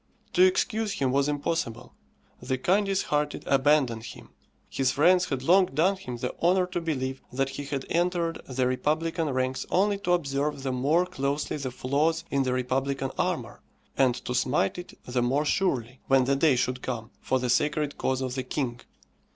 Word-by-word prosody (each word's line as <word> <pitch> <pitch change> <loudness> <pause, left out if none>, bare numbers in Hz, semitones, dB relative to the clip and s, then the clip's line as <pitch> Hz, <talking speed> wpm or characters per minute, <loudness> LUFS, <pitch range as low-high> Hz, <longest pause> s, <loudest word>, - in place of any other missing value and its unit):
To - - +3
excuse 210 +3 +2
him 135 -2 0
was 140 +1 +2
impossible. 145 -5 -2 0.5
The 130 - -1
kindest 195 +6 +1
hearted 150 0 -1
abandoned 135 -4 +2
him; - - -10 0.4
his 135 -2 0
friends 180 +6 +4
had 135 -6 -3
long 185 +5 +5
done 165 +8 +2
him 125 -10 -7
the 125 +1 -3
honour 180 +2 +3
to 180 -1 -4
believe 135 -5 -3
that 135 +1 0
he 145 +1 -6
had 140 -1 -4
entered 170 -1 0
the 130 0 0
republican 155 +5 0
ranks 130 0 -1
only 200 +2 +2
to 180 -2 +1
observe 145 -3 -1
the 135 - -1
more 145 +8 +2
closely 140 -2 -2
the 140 -3 -3
flaws 145 +6 0
in 140 - +2
the 130 -1 0
republican 135 +2 -1
armour, - - -2 0.3
and 130 -3 +3
to 125 - -2
smite 125 - +1
it 180 - -10
the 125 0 -1
more 135 +5 +1
surely, 130 - 0
when 135 -1 +4
the 135 +2 +2
day 140 0 +4
should 125 0 -1
come, 120 -2 -5
for 130 - +1
the 125 -1 -1
sacred 150 +1 0
cause 130 0 0
of 130 -1 -2
the 130 - -2
king. 125 -2 -3
140 Hz, 180 wpm, -27 LUFS, 130-165 Hz, 0.5 s, long